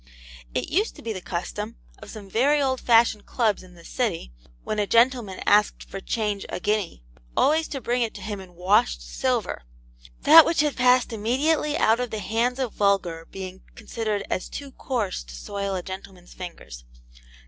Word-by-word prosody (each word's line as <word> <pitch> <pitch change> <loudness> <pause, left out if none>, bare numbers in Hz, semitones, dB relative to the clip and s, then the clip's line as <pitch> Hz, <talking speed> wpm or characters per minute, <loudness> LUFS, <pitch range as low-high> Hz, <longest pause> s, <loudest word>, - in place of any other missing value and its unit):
It - - -2
used 410 +6 +1
to - - -13
be 225 - -3
the 185 - -6
custom 210 +6 -4 0.2
of 215 - -11
some 205 -2 -9
very 270 +9 +3
old 260 -2 0
fashioned 230 -3 +3
clubs 220 -5 +1
in 185 -1 -16
this 170 -1 -14
city, 205 - -2 0.3
when 215 - -2
a 205 - +1
gentleman 230 -4 +2
asked 210 0 +3
for 195 - -6
change 210 0 -2
a - - -4
guinea, 205 - -1 0.3
always 315 +2 +3
to 275 - -5
bring 245 +2 0
it 230 -2 -1
to 205 - -8
him 205 0 -4
in 185 -2 -13
WASHED 175 - +2
SILVER: - - -1 0.6
that 320 +2 +10
which 330 -1 +2
had 300 -2 0
passed 250 -1 +3
immediately 290 +8 +1
out 225 +2 +3
of 250 -1 -2
the 220 - -4
hands 230 +5 0
of 260 -4 -2
vulgar 180 -5 0
being 190 -1 -8
considered 215 -2 -3
'as 185 - -3
too 280 -1 -7
coarse 230 - -3
to - - -11
soil 200 - -4
a 180 - -3
gentleman's 190 -1 -9
fingers.' 115 - -9
210 Hz, 180 wpm, -25 LUFS, 185-250 Hz, 0.6 s, that